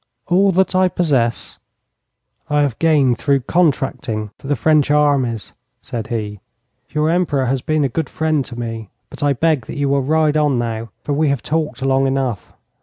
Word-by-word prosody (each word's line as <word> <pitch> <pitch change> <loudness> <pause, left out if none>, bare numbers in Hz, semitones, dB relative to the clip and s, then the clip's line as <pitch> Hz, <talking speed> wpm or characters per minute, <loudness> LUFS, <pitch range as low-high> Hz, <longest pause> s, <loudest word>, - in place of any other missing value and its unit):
'All 190 +3 +4
that 190 +1 +2
I 185 0 +4
possess 140 -10 -1 0.9
I 150 0 +2
have 140 -5 -2
gained 145 -7 +3
through 140 -2 +2
contracting 130 - 0
for - - -10
the 145 - +1
French 150 +3 +2
armies,' 140 -7 +1 0.3
said 115 -3 -5
he. 105 -3 -4 0.5
'Your 155 +1 +1
Emperor 160 -6 +1
has 130 +1 0
been 155 +2 0
a - - +2
good 140 +3 -3
friend 155 -3 0
to 120 - -9
me. 115 -3 -5 0.2
But - - -10
I 145 -1 +3
beg 150 -3 0
that - - -7
you 140 -1 0
will 140 0 +2
ride 155 +2 +2
on 145 -4 +2
now, 115 -1 -3
for 145 - -2
we 150 +1 +2
have 140 -5 -1
talked 150 -5 -2
long 135 0 +2
enough. 130 -6 -2
140 Hz, 180 wpm, -19 LUFS, 120-155 Hz, 0.9 s, All